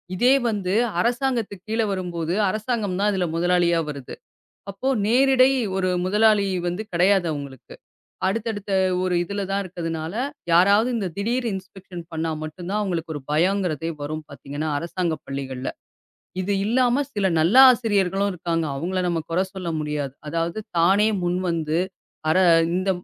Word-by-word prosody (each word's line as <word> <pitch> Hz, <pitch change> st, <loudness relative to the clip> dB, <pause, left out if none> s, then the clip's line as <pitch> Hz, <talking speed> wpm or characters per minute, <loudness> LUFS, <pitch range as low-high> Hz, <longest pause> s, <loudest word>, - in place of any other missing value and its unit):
இதே 245 Hz, +7 st, +4 dB, 0.2 s
வந்து, 200 Hz, -5 st, -1 dB, 0.3 s
அரசாங்கத்துக்குக் 235 Hz, -4 st, -1 dB
கீழ 225 Hz, +1 st, +1 dB
வரும்போது, 175 Hz, -3 st, -3 dB, 0.2 s
அரசாங்கம் 215 Hz, -2 st, -2 dB
தான் 205 Hz, +1 st, +2 dB
இதுல 190 Hz, -3 st, 0 dB
முதலாளியா 175 Hz, 0 st, +2 dB
வருது. 140 Hz, -3 st, -7 dB, 0.6 s
அப்போ 200 Hz, +7 st, -4 dB, 0.2 s
நேரிடை 260 Hz, +2 st, +5 dB, 0.3 s
ஒரு 185 Hz, -1 st, 0 dB, 0.2 s
முதலாளி 210 Hz, +1 st, +4 dB, 0.2 s
வந்து 175 Hz, +5 st, -2 dB
கெடையாது 180 Hz, +1 st, +3 dB
அவுங்களுக்கு. 140 Hz, -4 st, -8 dB, 0.5 s
அடுத்தடுத்த 205 Hz, 0 st, -2 dB, 0.3 s
ஒரு 185 Hz, -1 st, 0 dB
இதுல 200 Hz, +3 st, -3 dB
தான் 200 Hz, +1 st, 0 dB
இருக்கதுனால, 165 Hz, -2 st, -5 dB, 0.4 s
யாராவது 200 Hz, +7 st, +5 dB
இந்தத் 190 Hz, -7 st, -3 dB
திடீர் 240 Hz, +5 st, -1 dB
இன்ஸ்பெக்ஷன் 190 Hz, -2 st, -9 dB
பண்ணா 160 Hz, 0 st, -2 dB
மட்டும் 155 Hz, +3 st, -7 dB
தான், 210 Hz, +1 st, 0 dB
அவுங்களுக்கு 170 Hz, -5 st, -3 dB
ஒரு 145 Hz, -, -7 dB
பயங்கிறதே 165 Hz, -1 st, +1 dB
வரும் 155 Hz, +2 st, -4 dB
பாத்தீங்கன்னா, 145 Hz, +2 st, -5 dB
அரசாங்கப் 170 Hz, -1 st, -3 dB
பள்ளிகள்ல. 135 Hz, -1 st, -5 dB, 0.7 s
இது 190 Hz, +2 st, -2 dB
இல்லாம 250 Hz, +4 st, +2 dB
சில 205 Hz, -2 st, -1 dB
நல்ல 170 Hz, +8 st, +2 dB, 0.2 s
ஆசிரியர்களும் 200 Hz, -4 st, +1 dB
இருக்காங்க. 165 Hz, -1 st, -2 dB
அவுங்கள 185 Hz, +6 st, -2 dB
நம்ம 170 Hz, -1 st, 0 dB
குற 170 Hz, -, +1 dB
சொல்ல 185 Hz, -3 st, -4 dB
முடியாது. 150 Hz, -3 st, -3 dB
அதாவது 165 Hz, +5 st, -2 dB, 0.2 s
தானே 195 Hz, +6 st, +4 dB
முன்வந்து 170 Hz, -3 st, -1 dB, 0.5 s
அர 155 Hz, -, +3 dB, 0.4 s
இந்த 185 Hz, +2 st, 0 dB
185 Hz, 135 wpm, -23 LUFS, 165-205 Hz, 0.7 s, நேரிடை